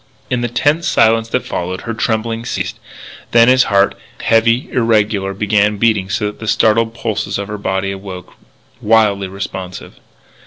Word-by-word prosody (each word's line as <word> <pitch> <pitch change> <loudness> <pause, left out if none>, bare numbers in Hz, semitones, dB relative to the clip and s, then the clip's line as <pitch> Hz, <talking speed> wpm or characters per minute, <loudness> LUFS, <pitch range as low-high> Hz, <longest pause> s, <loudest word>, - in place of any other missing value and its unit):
In 125 -1 0
the 120 - 0
tense 145 +7 +1
silence 115 0 +3
that - - -1
followed 90 +1 -4
her 115 - -4
trembling 115 +1 -2
ceased. - - -4 0.5
Then 115 0 +6
his 130 0 +5
heart, 100 -1 +3 0.3
heavy, 115 +2 +2
irregular, 105 -5 +1
began 105 0 +1
beating 105 -3 +1
so 105 0 -1
that 105 0 -5
the 110 - -7
startled 115 +1 +2
pulses 110 -3 -2
in 100 - -3
her 105 0 -6
body 95 -1 -1
awoke, 95 -2 -8 0.5
wildly 105 -3 +2
responsive. 95 -1 -7
110 Hz, 155 wpm, -16 LUFS, 100-115 Hz, 0.5 s, Then